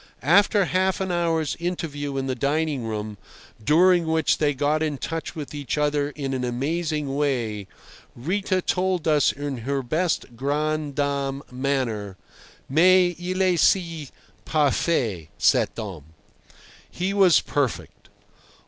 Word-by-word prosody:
After 200 Hz, +6 st, +4 dB
half 185 Hz, +2 st, +1 dB
an 190 Hz, -1 st, -2 dB
hour's 165 Hz, -4 st, 0 dB
interview 145 Hz, -5 st, -3 dB
in 135 Hz, -, -1 dB
the 130 Hz, -, -1 dB
dining 145 Hz, 0 st, -1 dB
room, 105 Hz, -2 st, -5 dB, 0.4 s
during 170 Hz, -, +4 dB
which 160 Hz, -1 st, +1 dB
they 145 Hz, -2 st, +1 dB
got 150 Hz, +3 st, +1 dB
in 150 Hz, -3 st, -1 dB
touch 165 Hz, +4 st, -5 dB
with 150 Hz, -2 st, -6 dB
each 145 Hz, 0 st, -3 dB
other 145 Hz, -1 st, +1 dB
in 140 Hz, -2 st, -4 dB
an 130 Hz, -1 st, -2 dB
amazing 145 Hz, +3 st, -2 dB
way, 120 Hz, -9 st, -1 dB, 0.5 s
Rita 185 Hz, +7 st, -1 dB
told 185 Hz, -2 st, 0 dB
us 150 Hz, -3 st, +4 dB
in 145 Hz, -1 st, -5 dB
her 135 Hz, +3 st, -2 dB
best 155 Hz, -2 st, -1 dB
grande 150 Hz, +2 st, -1 dB
dame 140 Hz, -1 st, -1 dB
manner: 125 Hz, -7 st, -2 dB, 0.5 s
"Mais 175 Hz, +4 st, +4 dB
il 185 Hz, +2 st, -2 dB
esi 170 Hz, -4 st, +2 dB, 0.3 s
parfait, 135 Hz, -, 0 dB
cet -, -, +3 dB
homme." 95 Hz, -10 st, -6 dB, 0.8 s
He 190 Hz, +2 st, -2 dB
was 190 Hz, -4 st, +5 dB
perfect. 140 Hz, -5 st, -3 dB
150 Hz, 130 wpm, -24 LUFS, 135-170 Hz, 0.8 s, was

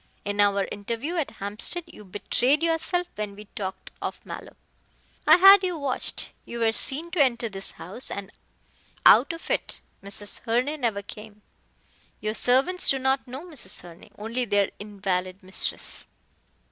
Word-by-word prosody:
In 205 Hz, 0 st, -3 dB
our 200 Hz, -1 st, +3 dB
interview 230 Hz, -, -4 dB
at 315 Hz, -, 0 dB
Hampstead 215 Hz, -, -2 dB
you 210 Hz, -, -14 dB
betrayed 245 Hz, -, +1 dB
yourself 335 Hz, +2 st, +1 dB
when 210 Hz, -1 st, -5 dB
we 210 Hz, +1 st, -11 dB
talked 190 Hz, -2 st, -6 dB
of -, -, -4 dB
Mallow. -, -, -9 dB, 0.7 s
I 315 Hz, +2 st, +9 dB
had 390 Hz, +1 st, +9 dB
you 360 Hz, -2 st, -1 dB
watched. 280 Hz, -4 st, 0 dB
You 235 Hz, -, -7 dB
were 225 Hz, -1 st, +2 dB
seen 300 Hz, +9 st, 0 dB
to 360 Hz, -4 st, +2 dB
enter 235 Hz, -3 st, 0 dB
this 195 Hz, -1 st, -3 dB
house, 200 Hz, +9 st, -6 dB
and 200 Hz, 0 st, -6 dB, 0.7 s
out 250 Hz, +9 st, +7 dB
of 330 Hz, 0 st, -7 dB
it -, -, -1 dB, 0.2 s
Mrs. 200 Hz, +1 st, -5 dB
Herne 255 Hz, +6 st, -1 dB
never 215 Hz, -4 st, 0 dB
came. 210 Hz, 0 st, -11 dB, 0.8 s
Your 215 Hz, 0 st, -2 dB
servants 270 Hz, +11 st, +3 dB
do 270 Hz, -, +4 dB
not 265 Hz, 0 st, 0 dB
know 265 Hz, +7 st, -7 dB
Mrs. 290 Hz, -, -1 dB
Herne 175 Hz, -1 st, -13 dB
only 230 Hz, +4 st, -2 dB
their 205 Hz, -3 st, +1 dB
invalid 190 Hz, -2 st, -3 dB
mistress." 185 Hz, +1 st, +1 dB
230 Hz, 155 wpm, -26 LUFS, 200-285 Hz, 0.8 s, I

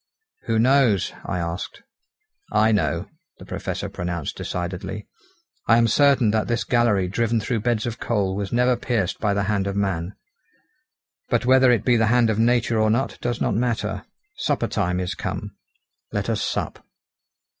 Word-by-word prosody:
"Who 115 Hz, -1 st, 0 dB
knows?" 120 Hz, -4 st, +3 dB
I -, -, -2 dB
asked. 85 Hz, +1 st, -5 dB, 0.7 s
"I 110 Hz, +1 st, +3 dB
know," 85 Hz, -3 st, 0 dB, 0.3 s
the -, -, -12 dB
Professor -, -, -4 dB
pronounced 85 Hz, -4 st, -4 dB
decidedly, 95 Hz, +3 st, -5 dB, 0.6 s
"I 115 Hz, -, +6 dB
am 115 Hz, -, +4 dB
certain 130 Hz, -2 st, +4 dB
that 110 Hz, 0 st, 0 dB
this 120 Hz, -1 st, 0 dB
gallery 115 Hz, -6 st, +2 dB
driven 115 Hz, +4 st, 0 dB
through 115 Hz, +1 st, -1 dB
beds 115 Hz, 0 st, 0 dB
of 120 Hz, -1 st, -4 dB
coal 100 Hz, -5 st, 0 dB
was 100 Hz, -1 st, -3 dB
never 125 Hz, +1 st, +3 dB
pierced 115 Hz, -6 st, -1 dB
by 100 Hz, -2 st, +1 dB
the 100 Hz, -, +1 dB
hand 100 Hz, -1 st, 0 dB
of 100 Hz, -, -3 dB
man. 95 Hz, -2 st, -2 dB, 1.1 s
But -, -, +1 dB
whether 130 Hz, 0 st, +5 dB
it 115 Hz, -3 st, +2 dB
be 125 Hz, -2 st, +4 dB
the 110 Hz, -1 st, +2 dB
hand 120 Hz, -1 st, +3 dB
of 110 Hz, -, -1 dB
nature 120 Hz, 0 st, +2 dB
or 110 Hz, -, +3 dB
not 120 Hz, +5 st, 0 dB
does 120 Hz, -1 st, -2 dB
not -, -, 0 dB
matter. 110 Hz, -3 st, -1 dB, 0.3 s
Supper 140 Hz, -5 st, 0 dB
time 90 Hz, -5 st, -1 dB
is 90 Hz, +2 st, -2 dB
come; -, -, -5 dB, 0.6 s
let -, -, -1 dB
us -, -, -1 dB
sup." -, -, -3 dB
110 Hz, 165 wpm, -23 LUFS, 95-120 Hz, 1.1 s, I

